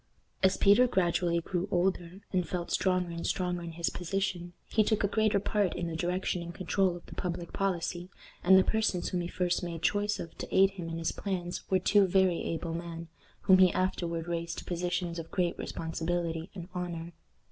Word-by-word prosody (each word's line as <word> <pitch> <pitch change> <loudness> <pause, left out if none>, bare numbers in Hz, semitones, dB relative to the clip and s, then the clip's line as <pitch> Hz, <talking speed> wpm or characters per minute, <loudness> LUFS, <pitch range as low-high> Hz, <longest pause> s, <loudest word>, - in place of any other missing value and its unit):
As 190 0 +4
Peter 210 +5 +6
gradually 175 -4 +1
grew 180 +2 -2
older, 180 0 0
and 180 -3 0
felt 175 -1 -3
stronger 185 -2 +1
and 170 0 -4
stronger 180 -1 -1
in 170 -1 -6
his 170 +1 -1
position, 180 -1 -2
he 220 - +3
took 215 0 +1
a - - +4
greater 215 0 +2
part 205 -1 0
in 175 - -2
the 165 -1 -3
direction 180 +1 -1
and 170 0 -7
control 190 -1 +1
of 175 - -11
the - - -11
public 175 -2 -4
policy, 180 -2 -1 0.3
and 190 +1 +7
the 190 - +6
persons 220 -5 0
whom 180 - -1
he 170 - -3
first 180 0 0
made 170 -2 -5
choice 205 0 +1
of 165 - -7
to - - -4
aid 195 +1 +5
him 180 -4 -6
in 165 - -4
his 165 -1 -1
plans 180 -3 -4
were 190 - +4
two 195 +2 +4
very 185 -1 +3
able 165 0 -3
men, 170 0 -6 0.3
whom 185 -1 +6
he 185 -2 +7
afterward 170 -3 -1
raised 170 -1 -3
to - - -7
positions 175 -1 -2
of 165 - -7
great 180 -3 0
responsibility 165 +1 -2
and 175 -2 -7
honor. 175 -2 -4
175 Hz, 200 wpm, -30 LUFS, 170-190 Hz, 0.3 s, and